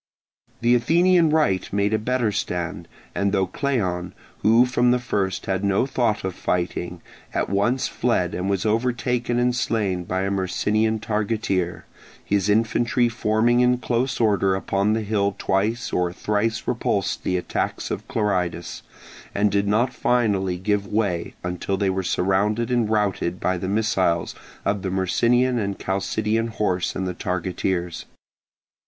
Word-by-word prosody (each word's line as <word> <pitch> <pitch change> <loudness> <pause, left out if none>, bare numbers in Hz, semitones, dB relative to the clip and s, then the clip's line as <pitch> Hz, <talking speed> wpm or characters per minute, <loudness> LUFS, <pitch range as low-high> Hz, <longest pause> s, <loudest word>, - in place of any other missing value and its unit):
The 120 +1 +4
Athenian 170 +7 +4
right 150 - +1
made 100 +1 +1
a 110 - +2
better 120 -1 0
stand, 90 -4 -3 0.3
and 100 0 0
though 95 -1 +2
Cleon, 95 -6 -2 0.2
who 115 +3 +5
from 125 -1 +2
the 125 - +4
first 100 -6 -2
had 95 0 -1
no 100 +4 +2
thought 120 -5 0
of 95 -1 -2
fighting, 90 -1 -2 0.3
at - - 0
once 120 +6 +1
fled - - 0
and 90 +2 -2
was 100 +1 0
overtaken 120 +2 0
and 125 0 +2
slain 100 -6 0
by 95 +2 -1
a 100 +1 -1
Myrcinian 105 +3 0
targeteer, 105 -4 -1 0.4
his 100 0 +1
infantry 115 +3 +2
forming 115 +1 +2
in 125 0 +4
close 125 +1 -1
order 100 -4 +2
upon 100 +2 0
the 110 0 -1
hill 100 -2 0
twice 110 +5 -1
or 90 -1 +1
thrice 105 +4 -1
repulsed - - -1
the 90 - 0
attacks 90 - -3
of 105 - -4
Clearidas, 95 -8 -1 0.5
and 100 0 +2
did 100 0 +1
not 120 +5 +2
finally 100 -7 +1
give 100 +2 -1
way 100 -6 -1
until 90 +2 -2
they 95 -1 +1
were 95 0 -1
surrounded 100 +6 0
and 120 -3 +1
routed 100 -4 0
by 90 - 0
the 95 - -3
missiles 95 -5 +1 0.3
of 100 0 0
the 95 - -2
Myrcinian 120 +7 +2
and 100 -2 -2
Chalcidian 110 +4 -1
horse 95 -5 -1
and 95 - -2
the 90 - -2
targeteers. 90 -1 -2
105 Hz, 150 wpm, -23 LUFS, 95-115 Hz, 0.5 s, who